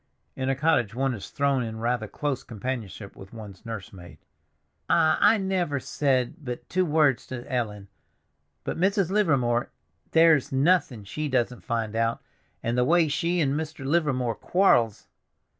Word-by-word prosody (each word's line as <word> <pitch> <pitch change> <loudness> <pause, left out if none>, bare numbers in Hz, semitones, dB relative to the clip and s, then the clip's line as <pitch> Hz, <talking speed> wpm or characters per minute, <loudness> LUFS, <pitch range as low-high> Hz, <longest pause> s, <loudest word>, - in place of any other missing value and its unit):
In 130 0 -2
a 135 - +1
cottage 130 -7 +1
one 135 +1 0
is 105 - -7
thrown 140 -2 +1
in 110 -2 -4
rather 120 -1 -1
close 140 +2 -3
companionship 110 -4 -6
with 95 +2 -13
one's 105 -4 -10
nurse 110 -4 -6
maid. 85 -2 -12 0.7
"Ah, 160 -2 +4
I 225 - +6
never 185 -7 -1
said 130 0 0
but 125 -2 -6
two 185 0 +1
words 150 -5 +2
to 125 -2 -6
Ellen; 110 -7 -3 0.8
but - - -4
Mrs. 195 0 +2
Livermore—there's 135 - +1
nothing 135 - +2
she 150 +10 -4
doesn't 125 -2 0
find 115 -3 -2
out. 115 0 0 0.4
And 115 +1 -1
the 125 - +3
way 165 +3 +3
she 170 +4 0
and 140 -3 +1
Mr. 155 -2 -4
Livermore 135 -6 +1
quar'ls!" 120 - +2
130 Hz, 150 wpm, -26 LUFS, 115-155 Hz, 0.8 s, I